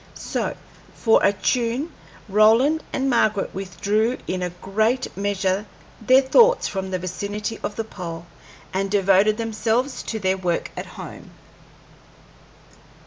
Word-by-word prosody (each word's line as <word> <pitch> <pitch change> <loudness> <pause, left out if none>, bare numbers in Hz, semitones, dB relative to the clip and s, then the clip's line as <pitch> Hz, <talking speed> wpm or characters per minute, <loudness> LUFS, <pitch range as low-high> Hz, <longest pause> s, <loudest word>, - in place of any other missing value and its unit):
So, - - -3 0.4
for 225 -2 +3
a 200 - +5
tune, 245 +8 -1 0.3
Roland 225 +10 +4
and 270 0 -1
Margaret 220 -5 +1
withdrew 205 +5 -1
in 185 0 -3
a 180 - -1
great 215 +8 -1
measure 200 0 -1 0.3
their 255 +4 +5
thoughts 475 - +5
from 190 -1 -4
the 185 - -1
vicinity 205 +4 -4
of 205 - -4
the 225 - -2
pole, 170 -6 -7 0.5
and 195 +1 -1
devoted 200 +1 +3
themselves 225 +3 -1
to 225 - -4
their 190 -2 0
work 180 -2 -2
at - - -6
home. - - -9
210 Hz, 130 wpm, -23 LUFS, 190-230 Hz, 0.5 s, a